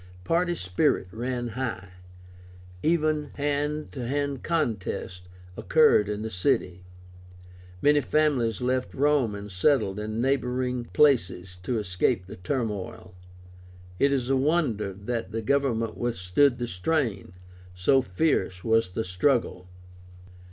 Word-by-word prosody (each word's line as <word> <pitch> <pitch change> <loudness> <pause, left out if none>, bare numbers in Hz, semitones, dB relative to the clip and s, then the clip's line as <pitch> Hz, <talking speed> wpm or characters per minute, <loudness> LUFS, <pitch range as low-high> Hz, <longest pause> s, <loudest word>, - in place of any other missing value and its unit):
Party 175 - +1
spirit 90 - 0
ran 120 +2 -3
high; 110 -5 -4 0.9
even 155 -2 +1
hand 145 +1 -2
to 125 -4 -5
hand 140 0 -2
contests 110 - -2 0.3
occurred 150 - +4
in 105 +1 -3
the 110 - -4
city. 90 0 0 1.0
Many 145 0 +5
families 130 -9 +1
left 125 +1 -1
Rome 140 -6 +2
and 100 0 -8
settled 95 0 +2
in 110 +1 -4
neighboring 125 -1 0
places 95 - +2
to 115 +6 -2
escape 90 -2 0
the 95 - -10
turmoil. 100 -2 -4 0.9
It 140 0 +4
is 130 -3 0
a - - +4
wonder 130 - +1
that 100 +1 -4
the 115 +1 -3
government 120 -4 0
withstood 120 +4 +2
the 120 -1 -3
strain, 100 - -1 0.4
so 130 +10 +3
fierce 95 - 0
was 115 -4 +2
the 110 - -1
struggle. 90 -1 0
120 Hz, 120 wpm, -26 LUFS, 100-140 Hz, 1.0 s, Many